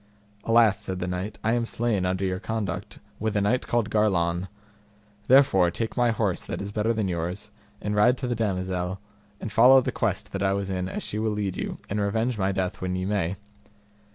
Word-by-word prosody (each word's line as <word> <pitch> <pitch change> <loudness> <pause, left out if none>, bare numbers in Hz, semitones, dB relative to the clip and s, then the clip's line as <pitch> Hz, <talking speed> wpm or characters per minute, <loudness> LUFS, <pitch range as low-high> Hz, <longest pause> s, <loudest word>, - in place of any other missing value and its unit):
Alas, 115 -3 +4
said 95 -3 -4
the 90 - -3
knight, 90 +3 -4
I 115 - +2
am 120 -1 0
slain 110 -7 0
under 95 +1 -1
your 95 0 -1
conduct 105 -6 -4 0.2
with 110 0 -1
a 105 - +2
knight 120 +6 +1
called 115 -3 0
Garlon; 90 -4 +1 0.8
therefore 130 -10 +5
take 110 +6 -4
my 120 -1 +3
horse 105 -5 0
that - - -5
is 100 0 -5
better 105 +2 0
than 110 -3 0
yours, 90 +4 -4 0.3
and 105 - -3
ride 120 +5 +4
to 130 - -4
the 120 - 0
damosel, 95 -3 -2 0.4
and 110 - -5
follow 130 +5 +7
the 130 - -1
quest - - -2
that 95 - -4
I 95 0 +2
was 100 -1 -2
in 90 0 -2
as - - -4
she 105 - -3
will 110 -1 0
lead 100 -3 -2
you, - - -4
and 105 +1 -2
revenge 110 +3 0
my 95 0 +1
death 95 -1 -2
when 90 0 -2
ye 90 0 -2
may. 95 -3 0
100 Hz, 210 wpm, -26 LUFS, 95-110 Hz, 0.8 s, follow